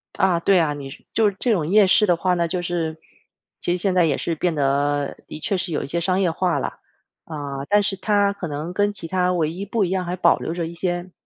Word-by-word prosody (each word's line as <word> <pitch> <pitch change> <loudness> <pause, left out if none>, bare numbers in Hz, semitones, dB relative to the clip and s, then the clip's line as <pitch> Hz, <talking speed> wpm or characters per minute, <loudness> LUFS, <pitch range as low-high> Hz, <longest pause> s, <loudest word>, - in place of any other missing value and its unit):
啊， 190 -3 +2
对 190 +2 +3
啊。 150 -3 +1
你 140 -2 -7 0.2
就 220 -2 +4
是 195 - -10
这 245 - +1
种 170 -8 +1
夜 205 +3 +5
市 210 +3 +5
的 175 - +3
话 180 +2 +1
呢， 170 -1 +1
就 175 +2 -2
是 165 -2 -2 0.6
其 175 - -1
实 180 - +1
现 185 +1 0
在 180 -2 +4
也 145 -4 +1
是 165 - -2
变 170 0 -1
得 145 0 0
的 - - -8
确 190 +4 -1
是 180 -1 -3
有 150 - -1
一 - - -6
些 170 +4 0
商 185 +2 +1
业 175 -3 +2
化 175 +1 0
了。 - - -5 0.5
啊， 140 -3 -5
但 205 0 +4
是 195 -1 -1
它 205 0 +2
可 195 -4 -6
能 150 +4 -4
跟 205 +1 +2
其 195 -5 -5
它 180 0 +1
唯 160 -3 0
一 185 +4 -6
不 210 +1 0
一 180 - 0
样 185 -1 -1
还 175 - -2
保 185 - +4
留 165 - -3
着 170 -1 -2
一 165 - -6
些 175 +1 -3
175 Hz, 280 characters per minute, -22 LUFS, 160-190 Hz, 0.6 s, 夜